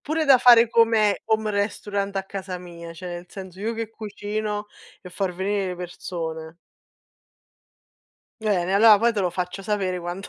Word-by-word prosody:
Pure 315 +2 -1
da 275 -3 +7
fare 240 -2 +7
come 225 -3 +3
home 220 -1 +1
restaurant 200 -1 -2
a 195 - 0
casa 190 -2 -6
mia, 170 -1 -10
cioè, 165 +2 -9
nel 175 0 -7
senso, 190 -1 -10
io 225 +2 -2
che 225 -1 -4
cucino 210 -1 -4 0.3
e 180 - -11
far 190 0 -2
venire 195 +1 -1
le 180 - -5
persone. 165 -2 -6 1.9
Bene, 195 -4 0
allora, 215 +1 +7
poi 230 +2 +2
te 205 - 0
lo 180 -2 0
faccio 180 +2 -4
sapere 190 -2 -1
quanto 175 +3 -6
200 Hz, 165 wpm, -24 LUFS, 180-215 Hz, 1.9 s, da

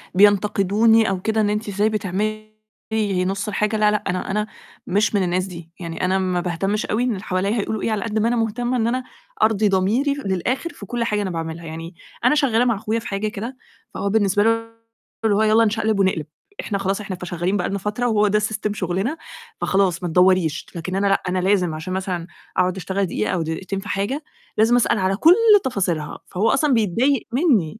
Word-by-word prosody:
بينتقدوني 205 +2 +4
أو 185 -1 -2
كده 220 +1 +1
إن 205 - +2
"أنتِ 210 0 -2
إزاي 205 +2 +1
بتعملي 215 +1 -3 0.7
نُص 195 +3 -2
الحاجة؟" 210 +1 0
لأ، 210 0 +4
لأ، 210 - -1
أنا 185 +1 -2
أنا 210 +1 -1 0.4
مش 205 +2 +1
من 195 - +2
الناس 180 +1 0
دي، 170 -3 -10
يعني 170 +1 -3
أنا 190 +1 +2
ما 185 -1 0
باهتمش 195 +4 -1
أوي 230 +4 0
إن 250 - +1
اللي 195 -1 -4
حواليّا 200 +4 0
هيقولوا 215 +1 -2
إيه، 225 - -1
على 210 -2 -1
قد 220 -1 -1
ما 225 - +2
أنا 240 - +1
مهتمة 240 +2 -1
إن 225 0 +1
أنا 255 +2 -1 0.4
أرضي 215 -1 +3
ضميري 215 +10 +2
للآخر 235 - -1
في 200 - -10
كلّ 240 +3 -2
حاجة 210 -2 0
أنا 190 - -2
باعملها، 165 0 -5
يعني 165 +2 -7 0.3
أنا 300 - +5
شغّالة 250 -5 +3
مع 235 -3 +2
أخويا 220 +3 -2
في - - -8
حاجة 200 +2 -2
كده، 230 +5 -6 0.4
فهو 200 - -2
بالنسبة 205 -1 +2
له 225 - +4 0.8
اللي 205 -2 +3
هو 215 - +2
"يالّا 220 +1 +4
نشقلب 220 -1 0
ونقلب، 185 -6 +1 0.4
إحنا 200 - -2
خلاص 195 +1 -1
إحنا 195 -2 -5
فشغّالين 180 +2 -2
بقى 180 - -1
لنا 200 - -2
فترة، 210 +5 -2
وهو 210 -2 +3
ده 210 +1 +2
system 210 -1 -2
شُغلنا، 195 - -2 0.4
فخلاص 190 -3 +1
ما 175 - -1
تدوّريش." 180 -3 +3
لكن 185 +3 -4
أنا 200 +1 +1
لأ 195 - +2
أنا 185 0 0
لازم، 180 -3 +2
عشان 170 +4 -5
مثلًا 185 -3 -3 0.3
أقعد 185 +1 +2
أشتغل 190 +1 -1
دقيقة، 105 -11 -2
أو 175 - 0
دقيقتين 185 +5 -3
في 205 +1 -9
حاجة، 225 +10 -2 0.3
لازم 225 +3 +4
أسأل 235 -3 +2
على 190 +1 +1
كلّ 330 - +6 0.3
تفاصيلها. 180 - -2
فهو 205 +5 0
أصلًا 285 -1 +2
بيتضايق 230 +5 +1
مني، 225 - +2
205 Hz, 205 wpm, -21 LUFS, 185-220 Hz, 0.8 s, كلّ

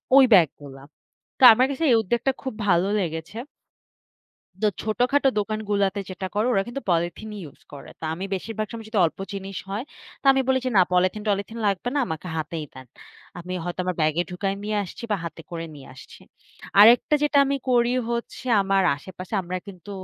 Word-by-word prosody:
ওই 275 - +9
ব্যাগ 175 -5 +7
গুলা। 135 -1 -11 0.6
তো - - 0
আমার 255 +3 +3
কাছে 280 +4 -3
এই 235 - +6
উদ্যোগটা 240 +6 0
খুব 260 -4 -4
ভালো 175 +1 +3
লেগেছে 165 +2 -4 1.2
তো 215 - +2 0.2
ছোটখাটো 250 +6 +2
দোকান 215 +1 -2
গুলাতে 200 0 +1
যেটা 185 +1 -5
করে, 210 +3 +1
ওরা 195 -4 +2
কিন্তু 270 +3 -6
পলিথিনই 175 +6 -2
ইউস 145 - -14
করে। 145 - -10
তো - - -7
আমি 180 +4 -6
বেশিরভাগ 215 +3 -4
সময় 225 -2 -8
যদি 220 -2 -1
অল্প - - -7
জিনিস 195 -1 -6
হয়, 205 +6 -3 0.4
তো - - -36
আমি 270 - +1
বলি 260 - +3
যে 255 - 0
না, 185 - +7
পলিথিন 185 +3 +2
টলিথিন 200 +3 -2
লাগবে 200 +3 0
না। 290 - +1
আমাকে 160 +3 -5
হাতেই 160 0 -4
দেন। 130 -1 -11 0.5
আমি 175 +1 -7
হয়তো 175 0 -5
আমার 185 -2 -2
ব্যাগে 155 +2 +2
ঢুকায় 195 +2 -2
নিয়ে 210 0 -1
আসছি 180 - -10
বা - - +2
হাতে 170 0 -7
করে 165 -1 -5
নিয়ে 140 -2 -12
আসছি। - - -14 0.6
আরেকটা 235 +7 +7
যেটা 295 -1 +3
আমি 275 0 0
করি 240 0 +3 0.2
হচ্ছে, 235 +2 -5 0.2
আমার 195 0 +2
আশেপাশে 185 +6 -9
আমরা 180 +1 -4
কিন্তু, 195 0 -11
195 Hz, 190 wpm, -24 LUFS, 175-230 Hz, 1.2 s, ওই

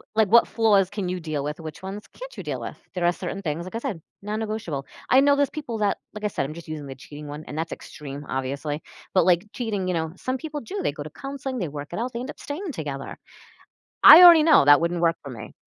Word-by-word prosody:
like, 220 -3 +3
what 235 +3 +6
flaws 205 -5 +3
can 200 -3 -4
you 180 0 -3
deal 155 -3 -3
with? 150 +2 -4
Which 160 +2 -9
ones 195 +2 -6
can't - - -10
you - - -4
deal - - -4
with? - - -7 0.2
There 180 - -2
are 175 - +4
certain 185 +2 -5
things, 165 -1 -3
like 185 - -8
I - - -1
said, 195 -6 -4 0.2
non-negotiable. 210 -9 -4 0.2
I 260 - +6
know 285 +1 +5
those 285 -1 +2
people 260 -7 -5
that 205 -1 +1 0.2
like 210 - -8
I - - +2
said 140 - -2
I'm 155 - -6
just 170 -1 -11
using 150 -2 -5
the 135 - -7
cheating 145 +3 -11
one, 145 +2 -7
and 150 - -7
that's 165 +1 -3
extreme, 145 -1 -9
obviously, 140 +3 -3 0.3
but, 185 -3 +4
like, 180 +1 +3
cheating, 205 -6 -3
you - - 0
know, 160 -1 -2
some 255 +6 -3
people 300 +1 -6
do, 395 - -6
they - - -1
go - - -6
to - - -8
counseling, 275 -1 -6
they 185 -7 -2
work 145 0 -7
it 175 - -4
out, 250 +2 -3
they 235 - -4
end 255 - -6
up - - -9
staying 320 +5 -5
together. 145 - -6 0.9
I 335 - +12
already 340 -3 +10
know 315 - +6
that 145 +1 +7
wouldn't 170 +1 0
work 165 0 +2
for 140 - -8
me. 110 -3 -9
185 Hz, 260 wpm, -24 LUFS, 150-235 Hz, 0.9 s, I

